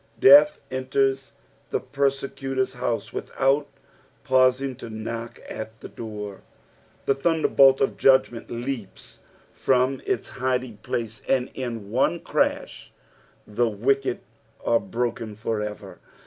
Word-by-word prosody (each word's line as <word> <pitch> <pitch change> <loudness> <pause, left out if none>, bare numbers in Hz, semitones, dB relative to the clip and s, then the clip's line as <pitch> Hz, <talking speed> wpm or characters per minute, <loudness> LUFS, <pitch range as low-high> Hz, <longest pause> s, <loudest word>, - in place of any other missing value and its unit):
Death 145 +4 +8
enters 135 +1 0 0.4
the - - 0
persecutor's 135 -1 -1
house 115 -3 -3
without 135 +2 0 0.6
pausing 130 +1 +3
to 120 - -8
knock 115 +2 -6
at 110 +1 -7
the - - -8
door. 105 -3 -7 0.6
The - - +3
thunderbolt 135 -2 +4
of 135 - +1
judgment 130 -3 +3
leaps 120 -3 -6 0.3
from 130 +1 +1
its - - -1
hiding 125 -3 -2
place, 115 -1 -4
and 130 -1 +1
in 115 -6 -5
one 135 +8 +2
crash - - -1 0.5
the 115 +3 0
wicked 130 +5 0 0.4
are 115 - +4
broken 115 -2 -3
for 110 0 -2
ever. 105 0 -7
125 Hz, 115 wpm, -24 LUFS, 115-135 Hz, 0.6 s, Death